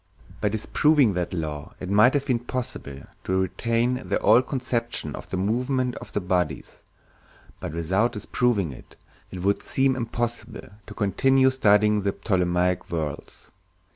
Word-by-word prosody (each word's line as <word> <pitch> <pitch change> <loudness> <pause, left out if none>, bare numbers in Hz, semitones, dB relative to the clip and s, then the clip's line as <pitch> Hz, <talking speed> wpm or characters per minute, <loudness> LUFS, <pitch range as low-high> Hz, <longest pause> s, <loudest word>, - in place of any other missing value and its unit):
By 105 - +2
disproving 125 +3 +3
that 90 -1 -2
law 75 -4 -5
it 90 - -6
might 105 +8 +5
have 140 -1 0
been 125 -4 +1
possible 115 - -6 0.2
to 95 0 0
retain 115 +6 0
the - - +1
old 115 +5 +4
conception 120 -3 -2
of - - -10
the 95 - -2
movements 125 +5 0
of - - -11
the - - +1
bodies, 90 -4 -2 0.8
but - - -6
without 95 +9 +1
disproving 105 - 0
it, 65 - -14 0.3
it 90 -1 -7
would 100 +1 +1
seem 135 0 +1
impossible 115 -2 -4 0.2
to 105 - -9
continue 130 +6 +3
studying 105 -4 +3
the 100 0 -1
Ptolemaic 90 -2 0
worlds. 80 -4 -5
105 Hz, 145 wpm, -25 LUFS, 90-125 Hz, 0.8 s, might